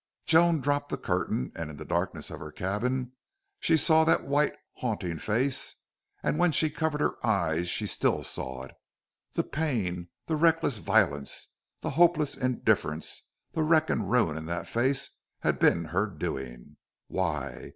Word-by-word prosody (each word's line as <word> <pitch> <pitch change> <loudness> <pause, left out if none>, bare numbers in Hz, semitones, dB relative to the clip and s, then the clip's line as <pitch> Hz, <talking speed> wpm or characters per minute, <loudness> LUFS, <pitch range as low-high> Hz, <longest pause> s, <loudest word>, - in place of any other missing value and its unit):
Joan 165 -1 +5
dropped 145 +1 0
the - - -2
curtain, 65 - -1
and 85 -2 -4
in 75 - -9
the - - -8
darkness - - -2
of - - -7
her 75 - -8
cabin 120 +9 -2 0.5
she 165 - +3
saw 160 +1 +5
that 165 - +3
white, 145 +1 +2 0.2
haunting 95 -9 -2
face, 130 - 0 0.5
and 150 - 0
when 175 -1 +4
she 155 0 +2
covered 150 0 -1
her - - -1
eyes 85 -6 +1
she - - -1
still - - +1
saw 65 0 -3
it. 65 - -10 0.6
The - - +1
pain, 100 - -2 0.2
the 160 - -1
reckless 165 -7 +3
violence, 70 -6 +1 0.3
the - - -2
hopeless 165 -4 +3
indifference, 120 - 0 0.2
the 160 - -1
wreck 155 0 +3
and - - -1
ruin 110 -11 +2
in 80 0 -6
that 85 0 -3
face 135 +4 +1 0.3
had - - +1
been 85 - +4
her 95 +6 0
doing. 65 - -6 0.3
Why? 75 -8 -3
120 Hz, 160 wpm, -28 LUFS, -, 0.6 s, Joan